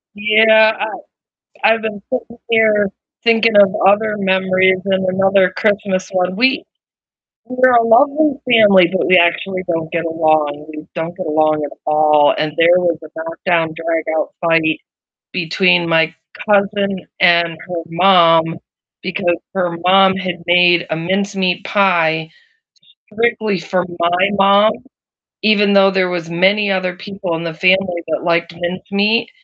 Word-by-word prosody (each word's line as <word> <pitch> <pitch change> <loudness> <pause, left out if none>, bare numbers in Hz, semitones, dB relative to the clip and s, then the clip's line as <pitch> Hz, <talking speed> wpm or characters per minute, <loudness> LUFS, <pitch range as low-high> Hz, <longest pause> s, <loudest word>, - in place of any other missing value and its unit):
Yeah, 220 +1 +4
I- 210 - -1 0.8
I've 225 0 +3
been 215 -2 -6
sitting 240 -2 -5
here 215 -2 +2 0.4
thinking 225 -2 +2
of 200 -1 +6 0.2
other 210 +1 +2
memories 190 -1 +1
and 190 -1 -1
another 195 0 +2
Christmas 200 -3 -1
one, 185 -1 -2
we- 265 +8 +1 0.8
we're 255 0 +2
a 235 -1 +4
lovely 285 +6 +2
family 200 -7 +5
but 190 - -1
we 185 - +4
actually 185 +2 +1
don't 165 -1 -4
get 165 -1 -2
along 155 -2 -1
we 155 0 -10
don't 165 +1 -5
get 185 - -6
along 155 0 0
at 145 - -9
all, 150 -1 +3
and 155 0 -2
there 170 +2 +4
was 170 -3 -1
a 155 - -11
knock-down, 165 0 -2
drag-out 165 -1 -3
fight 165 -2 +1 0.5
between 180 0 +1
my 165 0 +1 0.4
cousin 200 -2 0 0.2
and 170 -2 +4
her 165 +1 -8
mom 170 -2 +4 0.6
because 180 -2 -2 0.2
her 175 -3 -2
mom 190 +1 +4
had 180 -2 -5
made 175 0 +3
a - - -2
mincemeat 190 +2 -2
pie 165 -6 +1 0.9
strictly 220 -3 -1
for 180 +2 -3
my 175 +3 +1
mom 200 +2 +4 0.7
even 205 -1 +2
though 195 0 +4
there 190 -2 0
was 175 -2 -5
many 195 +4 +1
other 185 -1 -2
people 195 -2 -6
in 165 +1 -5
the 165 - -5
family 185 0 +1
that 160 - -3
liked 170 0 -1
mincemeat, 200 - -2
185 Hz, 140 wpm, -16 LUFS, 170-205 Hz, 0.9 s, of